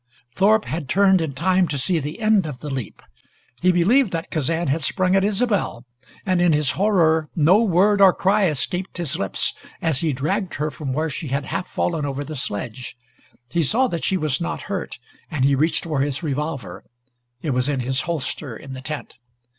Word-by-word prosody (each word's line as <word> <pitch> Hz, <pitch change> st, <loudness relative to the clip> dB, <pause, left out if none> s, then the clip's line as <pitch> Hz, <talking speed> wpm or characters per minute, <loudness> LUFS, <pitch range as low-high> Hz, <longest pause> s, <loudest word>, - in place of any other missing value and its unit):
Thorpe 215 Hz, +3 st, +3 dB
had 155 Hz, -4 st, -4 dB
turned 190 Hz, 0 st, +4 dB
in 155 Hz, -3 st, -3 dB
time 180 Hz, +5 st, +2 dB
to 145 Hz, -, -2 dB
see 165 Hz, +5 st, +2 dB
the 150 Hz, +9 st, -6 dB
end 215 Hz, -5 st, +3 dB
of 145 Hz, -4 st, -6 dB
the 145 Hz, +3 st, -7 dB
leap. 130 Hz, -5 st, -6 dB, 0.6 s
He 185 Hz, +1 st, +4 dB
believed 200 Hz, +7 st, +3 dB
that 165 Hz, +2 st, -4 dB
Kazan 160 Hz, +2 st, -1 dB
had 145 Hz, +4 st, 0 dB
sprung 185 Hz, +5 st, +1 dB
at 195 Hz, -, +3 dB
Isobel, 205 Hz, -, 0 dB, 0.4 s
and 185 Hz, -2 st, +1 dB
in 175 Hz, -2 st, +4 dB
his 150 Hz, -2 st, +3 dB
horror 165 Hz, -6 st, +2 dB
no 175 Hz, +7 st, +5 dB
word 200 Hz, 0 st, +3 dB
or 195 Hz, -1 st, +8 dB
cry 195 Hz, +2 st, +2 dB
escaped 180 Hz, +5 st, -2 dB
his 170 Hz, -6 st, +1 dB
lips 95 Hz, -, 0 dB, 0.3 s
as 160 Hz, -5 st, +1 dB
he 160 Hz, -2 st, 0 dB
dragged 175 Hz, +9 st, -2 dB
her 150 Hz, +1 st, -2 dB
from 135 Hz, 0 st, -5 dB
where 155 Hz, +4 st, -1 dB
she 155 Hz, +3 st, -5 dB
had 140 Hz, +1 st, -2 dB
half 180 Hz, -, -3 dB
fallen 165 Hz, -4 st, -1 dB
over 140 Hz, 0 st, -3 dB
the 155 Hz, +2 st, -7 dB
sledge. 125 Hz, 0 st, -5 dB, 0.5 s
He 170 Hz, -, +1 dB
saw 225 Hz, -, +4 dB
that 170 Hz, -5 st, -4 dB
she 190 Hz, -, +1 dB
was 155 Hz, -2 st, -1 dB
not 170 Hz, 0 st, -3 dB
hurt, 195 Hz, -4 st, -4 dB, 0.3 s
and 145 Hz, -6 st, 0 dB
he 140 Hz, -, +4 dB
reached 155 Hz, +3 st, +1 dB
for 155 Hz, -4 st, -2 dB
his 140 Hz, +2 st, -1 dB
revolver. 150 Hz, -1 st, -4 dB, 0.6 s
It 150 Hz, -, -1 dB
was 125 Hz, +2 st, 0 dB
in 135 Hz, -3 st, -1 dB
his 130 Hz, +2 st, 0 dB
holster 150 Hz, -6 st, -3 dB
in 135 Hz, -, -10 dB
the 130 Hz, -, -7 dB
tent. 150 Hz, 0 st, -7 dB
160 Hz, 200 wpm, -22 LUFS, 140-185 Hz, 0.6 s, or